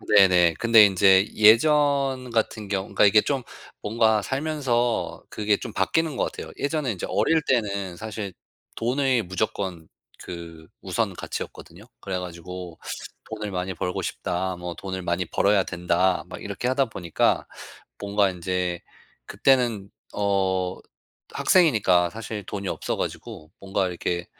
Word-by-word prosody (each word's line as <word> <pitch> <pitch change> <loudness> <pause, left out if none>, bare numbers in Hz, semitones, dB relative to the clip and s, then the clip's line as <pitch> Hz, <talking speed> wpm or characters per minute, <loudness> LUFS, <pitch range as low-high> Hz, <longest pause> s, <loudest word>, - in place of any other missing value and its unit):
네네. 90 -4 +6
근데 115 -2 +7
인제 95 0 +5
예전 135 +3 +4
같은 110 -2 -1
경우 95 -1 -1
그러니까 - - +3
이게 105 +1 +6
좀 135 0 -2 0.4
뭔가 110 0 +2
살면서 135 -3 -1
그게 105 -1 0
좀 - - -7
바뀌는 155 - 0
것 - - -1
같아요. - - -8
예전에 145 -4 -1
인제 90 - -5
어릴 160 +10 +2
때는 100 -7 -1
사실 105 -2 -6 0.4
돈이 125 0 +1
무조건 95 -3 -3 0.4
그 85 -2 -9
우선 - - -1
가치였거든요. 85 +5 -7 0.2
그래 95 -2 -3
가지고 90 -1 -8 0.5
'돈을 105 -2 -5
많이 90 0 -3
벌고 90 +1 -3
싶다. 95 +1 -3
뭐 90 0 -6
돈을 95 -1 -5
많이 85 +1 -1
벌어야 100 +3 +2
된다.' 90 +1 0
막 - - -9
이렇게 120 - -4
하다 135 +1 +2
보니까 90 -8 0 0.5
뭔가 100 -1 +2
인제 90 -1 -2 0.5
그때는 120 -7 +1 0.2
어 95 -2 0 0.6
학생이니까 105 - +4
사실 110 +1 -6
돈이 100 -1 -5
없어 - - -3
가지고 75 +1 -6
뭔가 95 0 -1
이렇게 85 0 -3
100 Hz, 290 characters per minute, -24 LUFS, 90-115 Hz, 0.6 s, 근데